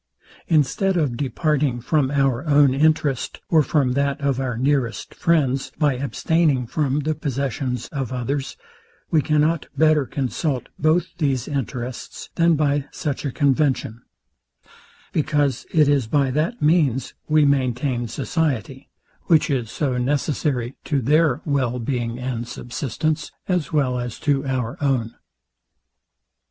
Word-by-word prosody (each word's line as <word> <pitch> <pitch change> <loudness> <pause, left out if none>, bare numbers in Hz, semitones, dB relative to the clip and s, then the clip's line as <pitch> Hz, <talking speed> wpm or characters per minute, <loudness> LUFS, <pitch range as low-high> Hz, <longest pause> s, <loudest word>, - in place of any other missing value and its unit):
Instead 170 +5 +2
of 145 -7 0
departing 140 0 0
from 135 +2 +1
our 135 -2 +1
own 145 -2 +5
interest, 150 -2 +1
or 160 -2 +6
from 145 -4 +1
that 140 +1 0
of 140 -3 0
our 125 -3 -2
nearest 130 -2 0
friends, 140 -6 +1
by 150 -3 +2
abstaining 140 +1 +1
from 145 +3 0
the 155 +2 0
possessions 135 -3 -3
of 135 -5 -4
others, 130 +2 -3 0.5
we 160 - +4
cannot 155 +1 +1
better 155 -3 +4
consult 135 +1 -2
both 160 +4 +1
these 135 -6 0
interests, 125 -3 -5
than 170 -1 +3
by 145 -2 +1
such 145 -4 -3
a 140 - -1
convention; 135 -5 +1 1.1
because 145 -4 0
it 155 -3 +4
is 140 -5 +2
by 140 +1 +2
that 155 - -1
means 150 -5 +2 0.2
we 155 -1 +5
maintain 130 -2 0
society, 135 - -2 0.4
which 160 -3 +3
is 125 -5 -1
so 130 -2 -1
necessary 135 -1 -1
to 145 - 0
their 150 +2 +2
well 130 -5 0
being 120 -1 -2
and 125 -2 -4
subsistence, 150 +6 -3 0.2
as 180 -4 0
well 135 -5 +1
as 120 -2 -5
to 140 -2 0
our 130 -1 -2
own. 125 -5 0
140 Hz, 130 wpm, -22 LUFS, 125-150 Hz, 1.1 s, or